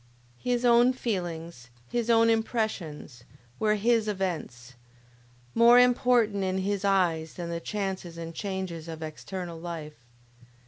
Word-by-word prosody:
His 245 0 0
own 240 +1 +5
feelings, 170 - -4 0.2
his 235 -1 -1
own 230 0 +5
impressions, 205 - -2 0.4
were 215 -1 +2
his 225 +1 +2
events; 165 -11 -4 0.8
more 235 +1 +7
important 245 -5 +3
in 190 0 -1
his 195 +1 -1
eyes 175 -5 +1
than 170 -1 -5
the 170 - -2
chances 190 -3 -4
and 165 0 -6
changes 185 -3 -4
of 160 -1 -6
external 170 +2 -6
life. 155 -6 -7
190 Hz, 125 wpm, -28 LUFS, 165-225 Hz, 0.8 s, more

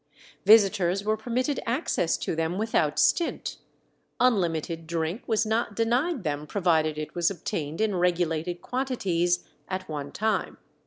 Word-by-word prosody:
Visitors 195 -3 +5
were 215 +1 +1
permitted 250 +5 -1
access 235 - 0
to - - -3
them 165 +2 -1
without 185 -9 +1
stint; 150 - +1 0.6
unlimited 170 -8 +1
drink 165 +6 -2
was 220 -1 +2
not 220 -1 -1
denied 245 - +1
them 150 -1 -3
provided 160 -5 +1
it 155 0 -5
was 175 -1 +2
obtained 160 -5 -4
in 220 -1 +1
regulated 175 -1 0
quantities 185 -10 0 0.2
at 185 0 -4
one 145 -2 -5
time. 220 +1 -1
180 Hz, 135 wpm, -27 LUFS, 165-220 Hz, 0.6 s, Visitors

